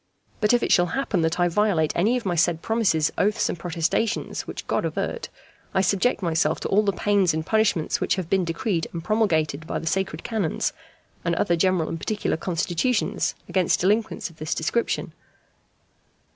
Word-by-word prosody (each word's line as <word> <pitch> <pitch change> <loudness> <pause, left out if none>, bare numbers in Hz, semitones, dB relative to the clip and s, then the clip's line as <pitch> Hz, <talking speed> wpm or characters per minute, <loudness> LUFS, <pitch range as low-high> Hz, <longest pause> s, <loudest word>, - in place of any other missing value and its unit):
But 210 -2 +3
if 240 -1 +3
it - - 0
shall 175 -1 +5
happen 220 -10 0
that 160 +2 0
I 175 - +4
violate 175 -4 +1
any 215 +8 +2
of 245 - -6
my 180 - 0
said 170 0 +1
promises, 200 -9 +2
oaths, 210 +2 +2
and 175 - -4
protestations 175 +5 -1
(which - - -6
God - - 0
avert!), 480 - -3 0.5
I 190 - +4
subject 195 +4 +1
myself 160 -2 +1
to - - -2
all 205 - +4
the 205 -2 +1
pains 195 -3 +2
and 160 0 -2
punishments 215 -7 +1
which - - +1
have 185 -3 -4
been 190 +1 +2
decreed 170 0 -1
and 165 -1 -5
promulgated 165 -7 +1
by - - -2
the - - -6
sacred 170 -2 -1
canons, 215 -9 -1 0.5
and 170 0 0
other 170 - +2
general 180 -1 +2
and 165 - -4
particular 210 +5 -1
constitutions, 180 +7 0
against 185 -3 +1
delinquents 210 -1 0
of 160 - -21
this 155 0 -2
description. 230 +9 -1
180 Hz, 180 wpm, -24 LUFS, 165-210 Hz, 0.5 s, shall